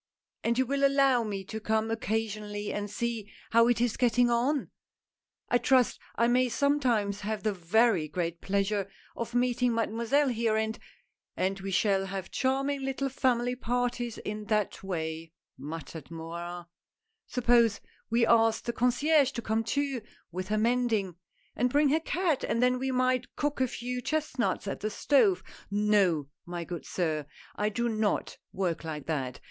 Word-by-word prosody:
And 235 +1 +1
you 260 - +3
will 275 +2 -1
allow 275 -3 +4
me 200 -3 -4
to 220 +3 -6
come 220 +1 0
occasionally 215 -2 -2
and 205 0 -3
see 225 0 -3 0.2
how 230 0 +6
it 240 -1 +2
is 240 -2 +1
getting 245 0 +3
on? 260 +5 +1 0.4
— - - -49
I 245 - +4
trust 250 0 +3 0.2
I 235 - +3
may 250 +1 +3
sometimes 235 -7 +1
have 210 0 -3
the 215 -1 +1
very 195 -1 +2
great 170 0 -3
pleasure 200 0 0 0.3
of 235 +1 -5
meeting 245 -1 +2
Mademoiselle 235 +5 +1
here 230 -2 +1
and 220 +1 -1 0.2
" - - -43
" - - -52
And 195 +1 -1
we 195 0 -5
shall 195 0 +2
have 195 -1 -5
charming 275 +1 0
little 270 0 -2
family 250 -2 +1
parties 245 -1 -2
in 210 0 -5
that 210 -1 0
way," 160 -3 -4 0.2
muttered 155 0 -8
Morin, 170 +1 -6 0.3
— - - -59 0.2
"suppose 235 -4 +3 0.3
we 230 +1 +3
ask 225 -1 +4
the 235 - -2
concierge 270 +4 +3
to 235 - -3
come 220 +1 0
too, 275 +2 -1 0.3
with 185 +2 -4
her 215 +2 0
mending, 225 -4 +1 0.4
and 250 +3 +2
bring 290 +2 +3
her 310 +3 +3
cat, 330 -2 0
and 230 - 0
then 250 +1 +3
we 265 +1 -1
might 255 -1 0
cook 290 -2 -1
a 260 - +3
few 250 +1 -4
chestnuts 285 -8 -1
at - - -3
the 215 - -2
stove. 210 -6 +3 0.3
No, 200 -7 +2 0.2
my 175 0 -5
good 170 -4 -7
sir, 155 -5 -1 0.3
I 210 0 0
do 235 +3 -1
not 215 -2 -1
work 180 -4 -2
like 155 -3 -5
that. 135 -6 -3
225 Hz, 170 wpm, -29 LUFS, 195-250 Hz, 0.4 s, how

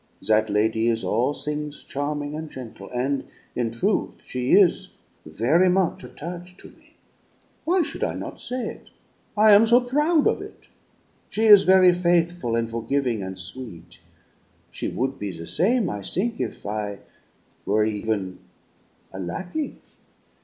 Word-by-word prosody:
That 110 0 +3
lady 110 +2 +1
is 115 -1 +1
all 120 +6 +1
things 150 0 -5
charming 145 +1 -3
and 155 0 -5
gentle, 115 -7 -9
and, 135 +3 -1 0.3
in 120 -2 0
truth, 115 +1 -1
she 125 0 -2
is 195 -4 +4 0.3
very 135 - +3
much 185 -1 +1
attach' 175 +3 -8
to - - -12
me - - -24 0.7
why 355 +1 +3
should - - -5
I - - -1
not - - -7
say 250 0 -4
it? - - -12 0.5
I 215 0 +7
am 215 +3 +7
so 240 +2 +6
proud 295 +6 +2
of - - +2
it. - - -12 0.6
She 220 - 0
is 205 -3 +9
very 185 -1 +6
faithful 175 -7 +1
and 115 0 0
forgiving 115 0 -1
and 95 0 -6
sweet; 95 0 -9 0.7
she - - -4
would 135 +2 -2
be 100 -1 -3
the 85 -1 -8
same, 215 - +1
I 105 - -4
think, 220 - -2
if - - -5
I 105 -1 -4 0.7
were 105 +1 +3
even 105 -3 -2 0.7
a 95 - -7
lackey. 180 - -4
140 Hz, 150 wpm, -24 LUFS, 110-185 Hz, 0.7 s, is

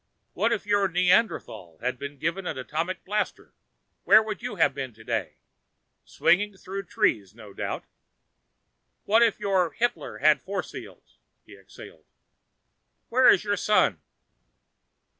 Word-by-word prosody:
What - - +1
if - - -1
your 205 -1 +2
Neanderthal 180 - 0
had 125 +1 -3
been 140 0 -7
given 170 +6 -3
atomic 160 +6 -4
blasters? 210 +2 -3 0.5
Where 215 +1 +6
would 215 0 -6
you 245 -3 -5
have 165 -6 +3
been 130 -4 -6
today? 110 0 -4 0.7
Swinging 205 +2 +1
through 195 +1 -6
trees, 110 - 0
no 105 -4 -13
doubt. - - -4 1.2
What 220 +3 +3
if 230 -3 +3
your 190 -4 +1
Hitler 240 +1 -2
had 150 -1 +4
force 195 +1 -5
fields?" - - -12 0.3
He - - -14
exhaled. - - -15 1.0
"Where 255 +2 +5
is 185 - +5
your 205 -1 -1
son?" 210 +3 +2
190 Hz, 130 wpm, -26 LUFS, 140-210 Hz, 1.2 s, Where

